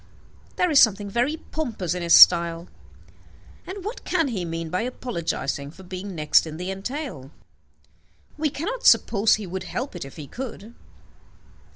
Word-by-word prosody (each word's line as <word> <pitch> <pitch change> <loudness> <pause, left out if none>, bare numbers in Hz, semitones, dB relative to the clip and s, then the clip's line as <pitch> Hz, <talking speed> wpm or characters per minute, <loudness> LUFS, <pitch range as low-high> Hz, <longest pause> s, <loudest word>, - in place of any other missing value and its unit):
There 360 -2 +1
is 285 - +6
something 205 -3 +3
very 245 +8 0
pompous 230 - -4
in 180 - -4
his 170 -1 +5
style. 170 0 +6 1.0
And 380 0 -7
what 440 +4 -6
can 325 -6 0
he 195 -7 -3
mean 165 -1 -5
by 185 - 0
apologizing 170 - -3
for 185 +5 -14
being 185 +1 -7
next 155 +1 +3
in 155 0 -7
the 180 +2 -4
entail? 195 - -6 1.1
We 305 0 0
cannot 440 - -5
suppose 210 0 +4
he 215 - -6
would 185 +1 -6
help 255 -4 -5
it, 175 - -5
if 135 - -11
he 150 - -8
could. 235 - -8
195 Hz, 160 wpm, -24 LUFS, 170-265 Hz, 1.1 s, is